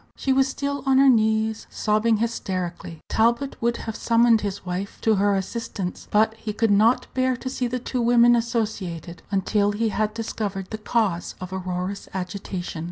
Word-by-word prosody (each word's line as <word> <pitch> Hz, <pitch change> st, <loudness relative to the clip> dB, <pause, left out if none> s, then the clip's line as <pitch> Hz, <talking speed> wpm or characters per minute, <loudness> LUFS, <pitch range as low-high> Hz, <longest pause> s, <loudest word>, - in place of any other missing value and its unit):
She 265 Hz, -, 0 dB
was 270 Hz, 0 st, +3 dB
still 280 Hz, +1 st, -3 dB
on 265 Hz, -1 st, +4 dB
her 275 Hz, 0 st, +7 dB
knees, 220 Hz, -1 st, +1 dB
sobbing 215 Hz, +1 st, +1 dB
hysterically. 185 Hz, -7 st, -3 dB
Talbot 235 Hz, +5 st, +1 dB
would 235 Hz, 0 st, +1 dB
have 225 Hz, -1 st, -4 dB
summoned 230 Hz, -1 st, +4 dB
his 200 Hz, -2 st, -4 dB
wife 185 Hz, +2 st, -4 dB
to 220 Hz, -2 st, +3 dB
her 200 Hz, +1 st, +3 dB
assistance, 195 Hz, -1 st, -4 dB
but 220 Hz, +1 st, +3 dB
he 220 Hz, -1 st, -6 dB
could 225 Hz, 0 st, +1 dB
not 220 Hz, +5 st, +4 dB
bear 255 Hz, -1 st, +1 dB
to 260 Hz, -, -5 dB
see 255 Hz, -2 st, -1 dB
the 250 Hz, +1 st, -2 dB
two 250 Hz, 0 st, -3 dB
women 240 Hz, 0 st, +5 dB
associated 210 Hz, -8 st, -3 dB
until 205 Hz, +1 st, +1 dB
he 220 Hz, +2 st, 0 dB
had 215 Hz, +1 st, -1 dB
discovered 205 Hz, -4 st, -4 dB
the 220 Hz, -, -4 dB
cause 210 Hz, -6 st, -1 dB
of 185 Hz, 0 st, -7 dB
Aurora's 185 Hz, +1 st, -4 dB
agitation. 180 Hz, -2 st, -5 dB
220 Hz, 170 wpm, -24 LUFS, 195-235 Hz, -, her